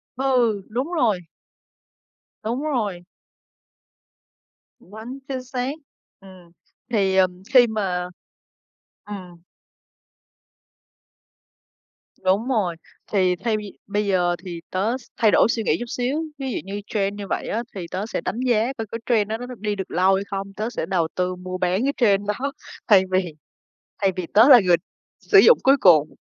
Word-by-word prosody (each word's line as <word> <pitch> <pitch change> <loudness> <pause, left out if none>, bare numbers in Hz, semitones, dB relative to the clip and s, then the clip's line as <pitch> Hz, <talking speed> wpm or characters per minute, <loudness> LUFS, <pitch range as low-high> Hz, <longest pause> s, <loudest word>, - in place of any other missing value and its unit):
Ừ, 245 -5 +1
đúng 255 +9 -3
rồi. 235 - +2 1.2
Đúng 235 +5 -2
rồi. 210 -12 -2 1.7
Quá 220 +7 -10
chính 260 -2 -4
xác, 255 +1 -3 0.5
ừm. 185 -3 -16 0.4
Thì, 195 -4 +2
ờ, 190 -1 +5 0.3
khi 250 -2 +7
mà 185 -5 -2 1.0
ừm. 185 -4 -9 2.8
Đúng 195 +6 +2
rồi, 210 -10 0 0.4
thì 185 -3 +2
thay 220 +3 -1
vì 210 -2 -9
bây 205 +1 -1
giờ 180 -3 +1
thì 170 -2 -6
tớ 210 +7 0
s 260 - -17
thay 220 -2 +4
đổi - - +5
suy 225 -2 -1
nghĩ - - +1
chút 240 - -4
xíu, 255 +7 -2
ví 270 -2 -4
dụ - - -2
như 200 +2 -6
trend 200 -1 -1
như 200 -1 -6
vậy - - -3
á 230 +2 -2
thì 185 -3 -5
tớ 190 +3 -3
sẽ 225 - -4
đánh 230 - -3
giá 240 +1 +2
coi 225 - -3
cái 230 - -4
trend 215 -4 +2
đó 220 - -2
nó 245 - -7
đi 210 0 -2
được 190 -1 -6
lâu 185 +2 +3
hay 195 - -1
không, 195 0 -5
tớ 215 +3 -3
sẽ 245 - -4
đầu 175 -4 0
tư 180 0 -1
mua 185 0 -6
bán 185 +4 0
cái 280 +1 +1
trend 205 -4 +2
đó 255 +7 -2 0.4
thay 200 -4 +6
vì 185 -3 0 0.7
thay 195 - +3
vì 180 -2 -3
tớ 220 +6 +7
là 255 -4 +10
người 180 -3 +4 0.4
sử 410 - +4
dụng 470 +4 +7
cuối 270 +1 +5
cùng. 155 -5 +5
205 Hz, 165 wpm, -23 LUFS, 185-240 Hz, 2.8 s, là